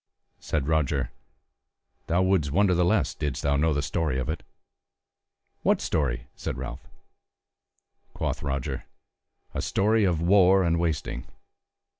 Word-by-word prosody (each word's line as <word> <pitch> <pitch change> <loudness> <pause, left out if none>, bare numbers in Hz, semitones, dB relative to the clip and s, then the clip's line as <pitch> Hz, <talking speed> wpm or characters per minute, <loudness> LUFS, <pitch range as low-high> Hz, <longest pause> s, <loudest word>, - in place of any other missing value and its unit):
Said 75 -3 -2
Roger: 75 -5 +1 1.0
"Thou 90 +3 +2
wouldst 95 -7 +2
wonder 95 +3 +3
the 90 0 +3
less 90 +3 +2
didst 75 -3 -3
thou 70 0 +2
know 80 +3 +2
the 70 -1 0
story 80 -6 -1
of 65 - -2
it." - - -2 1.2
"What - - +3
story?" - - -1
said - - -4
Ralph. 65 0 -7 1.3
Quoth - - -2
Roger: 70 -2 -3 0.7
"A - - -2
story 110 +2 +2
of 90 -5 +2
war 95 +2 +5
and 85 -1 +1
wasting." 80 -7 -2
80 Hz, 130 wpm, -26 LUFS, 70-90 Hz, 1.3 s, war